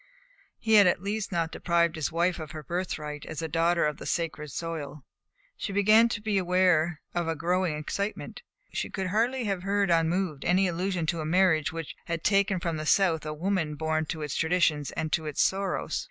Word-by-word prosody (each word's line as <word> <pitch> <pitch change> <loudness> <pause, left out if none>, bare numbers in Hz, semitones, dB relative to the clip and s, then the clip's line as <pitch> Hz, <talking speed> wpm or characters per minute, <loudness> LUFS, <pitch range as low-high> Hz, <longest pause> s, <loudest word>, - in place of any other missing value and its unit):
He 220 -1 0
had 205 -3 +8
at 175 - +1
least 205 +1 -3
not 165 -2 -1
deprived 170 -1 +1
his 155 -2 -2
wife 170 +2 +1
of 155 -2 -7
her 155 -1 -7
birthright 155 -4 -4
as 160 0 -5
a - - -1
daughter 165 +2 +2
of 150 -1 -1
the - - -8
sacred 160 -3 -2
soil. 150 -3 -5 0.5
She 205 - -4
began 215 +4 +5
to 205 - -2
be 210 -2 +1
aware 175 -3 +2
of 175 -1 -1
a 165 - 0
growing 175 0 0
excitement. 200 +7 -4 0.3
She - - -2
could 190 -1 -3
hardly 240 +6 +1
have 195 -4 -2
heard 200 -1 +1
unmoved 165 -2 +1
any 185 +2 +3
allusion 180 0 -1
to 165 0 -1
a - - -4
marriage 165 -3 +3
which 165 -2 -6
had 170 -2 -3
taken 195 -1 +2
from 170 -2 -2
the 155 - -4
South 165 -5 +3
a 150 - -3
woman 170 -2 -1
born 160 +1 -1
to 160 -1 -4
its 150 - -4
traditions 160 -3 +1
and 155 0 -3
to 160 -1 0
its 150 - +1
sorrows. 195 0 -1
170 Hz, 200 wpm, -28 LUFS, 155-190 Hz, 0.5 s, had